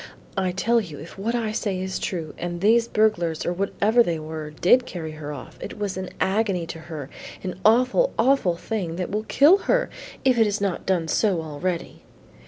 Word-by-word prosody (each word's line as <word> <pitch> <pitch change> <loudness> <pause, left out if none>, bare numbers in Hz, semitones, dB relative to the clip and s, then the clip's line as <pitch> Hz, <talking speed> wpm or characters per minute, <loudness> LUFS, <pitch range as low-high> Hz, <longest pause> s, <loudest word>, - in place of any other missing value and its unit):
"I 190 -1 0
tell 230 +6 +2
you 165 -8 -8
if 160 +4 -10
what 230 +4 -1
I 225 -3 -1
say 200 -3 -2
is 190 0 -3
true, 165 -5 -3
and 175 0 -3
these 230 +4 +4
burglars 175 -8 +1
or 175 - 0
whatever 200 +5 +2
they 170 -8 +1
were, 155 0 -6
did 185 +11 +3
carry 160 -3 -5
her 155 -1 -7
off, 145 -3 -9
it - - -7
was 205 -2 -2
an 185 -1 -4
agony 195 -3 +1
to 165 - -10
her, 150 -5 -5 0.4
an 185 -1 -5
awful, 255 - +4
awful 230 -7 +3
thing 180 -5 -3
that 180 0 -3
will 215 +2 -2
kill 305 - +6
her - - +2 0.3
if 255 -3 +4
it 225 - +6
has 210 0 -1
not 200 -3 -2
done 180 -4 +1
so 180 -1 +1
already. 165 +3 -4
190 Hz, 195 wpm, -24 LUFS, 170-220 Hz, 0.4 s, kill